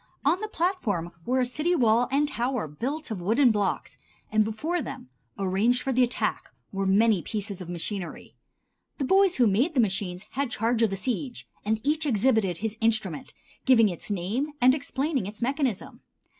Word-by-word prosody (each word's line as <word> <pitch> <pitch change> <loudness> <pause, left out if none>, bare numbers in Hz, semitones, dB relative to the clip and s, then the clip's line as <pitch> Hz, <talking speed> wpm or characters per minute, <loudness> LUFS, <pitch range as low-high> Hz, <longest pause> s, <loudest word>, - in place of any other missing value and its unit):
On 325 +6 +3
the 430 - -3
platform 290 - -1 0.2
were 255 +1 +2
a - - +2
city 305 +8 0
wall 235 -3 +3
and 290 +2 +2
tower 250 - -2
built 260 - -4
of 200 -5 -4
wooden 235 +7 +4
blocks, 205 -2 -2 0.3
and 215 0 +4
before 305 +12 -2
them, 180 - -7 0.3
arranged 200 +6 +1
for 270 - -1
the 255 - +3
attack, 245 0 0 0.2
were 195 0 -1
many 205 0 +4
pieces 200 -2 -4
of 175 - -8
machinery. 175 +2 -5 0.6
The 280 - -2
boys 385 +4 +4
who 250 - +4
made 240 - +2
the - - +3
machines 190 -3 -1
had 275 0 -1
charge 230 +1 0
of 225 - +4
the 195 - -2
siege, 245 +5 -3 0.2
and 215 +1 0
each 305 +2 +1
exhibited 220 - +2
his 220 +3 -4
instrument, 215 -8 0 0.3
giving 230 -5 +6
its 175 +2 -3
name 210 - -2
and 255 +1 +6
explaining 275 - -1
its 210 +2 -8
mechanism. 260 -4 -2
230 Hz, 175 wpm, -26 LUFS, 200-270 Hz, 0.6 s, giving